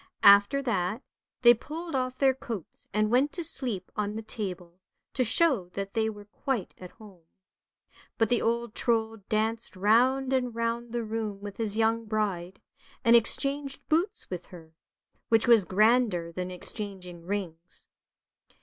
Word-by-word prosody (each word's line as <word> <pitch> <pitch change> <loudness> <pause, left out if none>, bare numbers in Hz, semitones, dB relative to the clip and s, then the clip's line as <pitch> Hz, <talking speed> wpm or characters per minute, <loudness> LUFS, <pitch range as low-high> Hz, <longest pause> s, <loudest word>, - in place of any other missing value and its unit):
After 200 +8 +7
that 200 -1 -1 0.4
they 240 0 +9
pulled 320 +8 -7
off 255 -1 -1
their 270 -1 +4
coats 230 -8 -8
and 215 +1 +1
went 265 +4 +3
to 345 - -4
sleep 240 - -2
on 210 0 -2
the 220 - -5
table, 180 -5 -6 0.3
to 255 - +1
show 235 - +2
that 195 0 -5
they 220 -1 +1
were 205 -1 -9
quite 235 0 -3
at 180 - -9
home. 200 -7 -16 0.9
But 225 -2 +2
the 240 - +3
old 235 -1 -1
Trold 225 -3 0
danced 220 +1 -1
round 255 +7 +3
and 250 -3 0
round 230 0 -2
the 240 0 -2
room 215 -2 -4
with 200 0 -8
his 220 -2 -2
young 225 0 +2
bride, 195 -4 -2 0.4
and 230 0 +6
exchanged 275 +4 0
boots 355 +7 0
with 180 -1 -6
her, 165 -3 -13 0.6
which 225 0 +3
was 230 -5 +6
grander 210 -3 +2
than 180 +2 -4
exchanging 180 -1 -7
rings. 180 -4 -5
220 Hz, 150 wpm, -28 LUFS, 195-240 Hz, 0.9 s, they